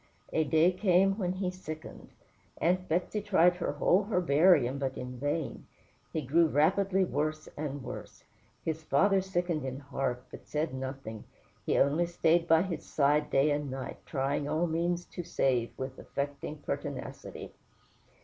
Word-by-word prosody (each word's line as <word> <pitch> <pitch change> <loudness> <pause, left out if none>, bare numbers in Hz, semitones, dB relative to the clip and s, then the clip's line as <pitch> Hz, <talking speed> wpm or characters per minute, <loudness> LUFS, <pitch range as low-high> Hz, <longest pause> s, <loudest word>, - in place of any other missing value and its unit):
A 160 - +3
day 160 +4 +4
came 190 +1 +3
when 180 -2 0
he 185 -1 -2
sickened. 155 -4 -9 0.5
Aunt 180 +2 +1
Betsey 180 +6 0
tried 180 -3 +4
her 170 - -2
whole 180 +7 +3
herbarium, 160 - +4
but 135 -1 -2
in 125 0 -6
vain: 145 +2 -2 0.4
he 160 - -2
grew 160 +6 +4
rapidly 190 +6 +3
worse 155 -1 -2
and 145 -2 -4
worse. - - -8 0.4
His 160 -1 -2
father 190 +6 +3
sickened 175 -5 -1
in 130 -1 -4
heart, 135 -3 -3
but - - -11
said 155 -1 -1
nothing; 130 -4 -6 0.4
he - - +2
only 155 +5 +3
stayed 170 0 +2
by 165 +1 +5
his 175 -4 -3
bedside 150 +1 +1
day 140 +2 +3
and 145 -1 -1
night, 130 0 -6
trying 140 0 -1
all 155 +3 +1
means 170 +1 -1
to - - -6
save, 130 -8 +1
with 130 0 -5
affecting 140 +1 -4
pertinacity. 145 - -6
155 Hz, 150 wpm, -30 LUFS, 140-175 Hz, 0.5 s, by